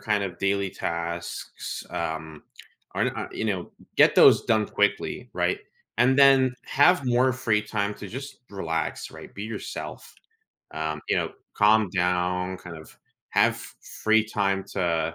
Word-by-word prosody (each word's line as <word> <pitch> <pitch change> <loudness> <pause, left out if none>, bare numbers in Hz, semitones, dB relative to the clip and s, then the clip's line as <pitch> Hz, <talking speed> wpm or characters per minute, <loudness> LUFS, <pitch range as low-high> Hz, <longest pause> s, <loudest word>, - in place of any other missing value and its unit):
kind 105 -2 0
of, 90 -3 -6
daily 100 -1 0
tasks, 85 -2 -5
um 80 -2 -4 0.5
Aren't - - 0
I - - -3
you 110 - -3
know, 95 -4 -1
g - - -21 0.3
get - - +6
those - - +7
done 110 -2 +2
quickly, 105 +4 -1
right? 90 0 +1 0.4
And 130 +3 +4
then, 135 -2 +6
have 145 0 +4
more 125 +1 +3
free 115 -4 +1
time 105 -1 -2
to 100 - -8
just 135 +6 -8
relax, 80 -5 -3
right? - - -12
Be 100 - -6
yourself, 110 -2 -7 0.6
um, 80 -1 -3
you - - +2
know, - - -1 0.2
calm 105 0 +4
down, 90 0 0
kind 90 -2 -9
of 80 - -15 0.3
have - - +3 0.5
free 110 0 +5
time 100 -3 0
to 85 -3 0
100 Hz, 150 wpm, -26 LUFS, 90-110 Hz, 0.6 s, those